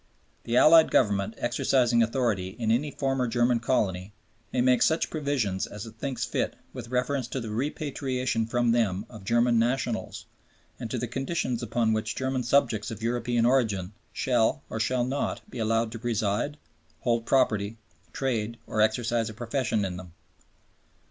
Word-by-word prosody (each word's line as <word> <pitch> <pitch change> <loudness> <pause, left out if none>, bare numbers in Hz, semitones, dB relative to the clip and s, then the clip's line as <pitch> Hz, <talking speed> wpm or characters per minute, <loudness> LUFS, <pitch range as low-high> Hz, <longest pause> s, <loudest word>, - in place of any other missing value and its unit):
The 120 +1 +1
Allied 160 +3 +7
Government 100 +1 +2
exercising 120 0 +2
authority 110 -5 0
in 115 -2 0
any 135 +6 +1
former 135 -3 -1
German 120 +1 +2
colony 100 -5 -1 0.4
"may - - -1
make 125 -1 +4
such 160 +1 +2
provisions 140 - -1
as 105 +1 -8
it 110 0 -12
thinks 130 -4 -2
fit - - -2 0.2
with - - -7
reference 125 +1 -1
to 130 - -4
the 115 -3 -5
repatriation 130 -2 -2
from 120 0 +1
them 105 -4 +1
of 110 -4 -11
German 120 +3 +3
nationals 120 -1 -1 0.5
and 115 - -5
to 125 - -2
the 120 - -2
conditions 130 -1 -2
upon 115 -1 +1
which 110 0 -2
German 130 -1 -1
subjects 120 -3 +2
of 110 -1 -7
European 120 0 +1
origin 110 -7 +1 0.2
shall, 120 -4 +1
or 110 - -3
shall 125 +2 +1
not, 135 +3 -3
be 125 - -7
allowed 115 0 +1
to 115 - -6
reside, 115 +4 -1 0.4
hold 115 -1 0
property, 110 -5 +2 0.3
trade 115 -4 -2
or 110 - -1
exercise 115 +1 +1
a 110 - -9
profession 115 -2 -1
in 90 -2 -4
them." 90 -2 -10
120 Hz, 160 wpm, -27 LUFS, 110-130 Hz, 0.5 s, Allied